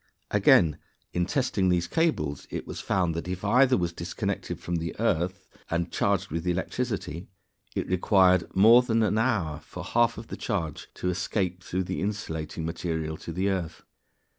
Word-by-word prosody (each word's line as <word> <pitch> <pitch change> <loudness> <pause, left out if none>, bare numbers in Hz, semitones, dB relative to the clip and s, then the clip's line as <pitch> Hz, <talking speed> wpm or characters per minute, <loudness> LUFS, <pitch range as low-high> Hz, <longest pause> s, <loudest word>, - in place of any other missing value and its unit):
Again, 75 -3 +5 0.3
in 90 0 0
testing 110 -8 +1
these 90 -1 +2
cables 80 - 0
it - - -5
was - - -6
found 90 -3 +1
that 85 +2 -4
if 90 +2 -4
either 125 +4 +5
was 85 -2 -1
disconnected - - -3
from 85 0 -2
the 80 +2 -5
earth 95 -3 0 0.2
and 85 +1 -1
charged 100 -1 0
with 85 +2 -3
electricity, 95 -2 -2 0.5
it - - -1
required 95 0 +4
more 115 +6 +8
than 115 -3 +1
an 110 0 +2
hour 100 -11 0
for - - -9
half 120 -1 +2
of 110 +1 -9
the - - -6
charge 85 -9 -3
to 90 - -1
escape 90 0 -2
through 95 +1 -2
the - - -3
insulating 80 -6 -3
material 80 -2 -3
to 85 - -7
the 95 +4 0
earth. 90 -4 -4
90 Hz, 165 wpm, -27 LUFS, 85-105 Hz, 0.5 s, more